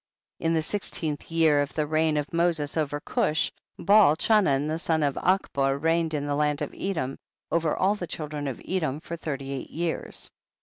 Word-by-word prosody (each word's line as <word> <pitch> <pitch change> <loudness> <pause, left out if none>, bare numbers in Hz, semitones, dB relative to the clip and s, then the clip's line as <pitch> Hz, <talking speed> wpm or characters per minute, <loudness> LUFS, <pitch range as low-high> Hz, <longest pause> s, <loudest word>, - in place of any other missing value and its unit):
2. - - -7
In 165 - +2
the 160 - +1
sixteenth 160 -5 -3
year 160 -3 +4
of 145 - -3
the 155 - +1
reign 155 0 +1
of 150 +2 -3
Moses 165 -3 +1
over 145 -2 -1
Cush, 155 +1 0 0.3
Baal 200 -5 +6
Chanan 160 -8 +3
the 160 +1 -2
son 160 -2 +1
of 140 -1 +2
Achbor 140 -7 +1
reigned 165 +1 +1
in 145 -1 -2
the 145 - -1
land 150 +1 +1
of 145 - -5
Edom 160 -9 -3 0.3
over 165 -2 +1
all 195 +2 +3
the 185 -4 -5
children 150 -2 -4
of 130 - -4
Edom 155 -7 -1
for 170 +1 -6
thirty 140 -4 -5
eight 135 -2 -5
years. 170 +1 -4
155 Hz, 190 wpm, -26 LUFS, 145-165 Hz, 0.3 s, Baal